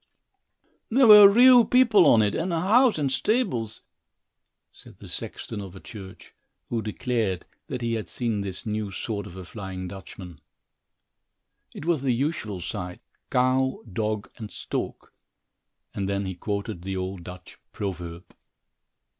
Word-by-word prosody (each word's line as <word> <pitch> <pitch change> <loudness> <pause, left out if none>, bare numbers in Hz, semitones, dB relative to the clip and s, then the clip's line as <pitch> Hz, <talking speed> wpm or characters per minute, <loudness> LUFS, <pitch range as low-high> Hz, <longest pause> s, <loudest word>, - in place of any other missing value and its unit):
"There 255 +3 +4
were 210 -2 +11
real 245 +3 +7
people 230 -8 +5
on 115 -5 +6
it 105 - 0
and 175 +3 -2
a 165 - 0
house 225 +6 +4
and 140 -3 0
stables," 130 - -1 0.9
said - - -16
the - - -12
sexton 105 -2 -6
of 95 -1 -9
a - - -9
church, 95 -3 -11 0.4
who 115 -2 -1
declared 110 -4 -2 0.2
that 125 -1 -5
he 115 0 -1
had 110 -2 -4
seen 115 -4 -2
this 95 +1 -6
new 105 -1 -2
sort 100 +2 -4
of 85 - -11
a 95 - -8
flying 95 -2 -7
Dutchman. 90 -3 -10 1.3
It - - -9
was 165 -5 +1
the 135 -2 +1
usual 115 - -2
sight 90 -1 -5 0.3
"cow, 130 +1 +1
dog, 110 0 -2
and 110 -4 -7
stork," - - -5 0.8
and 100 -1 -3
then 100 0 -1
he 95 - -3
quoted 100 +1 -4
the 95 +1 -4
old 95 -1 -4
Dutch 90 +1 -11
proverb. 90 -3 -6
110 Hz, 145 wpm, -25 LUFS, 95-140 Hz, 1.3 s, were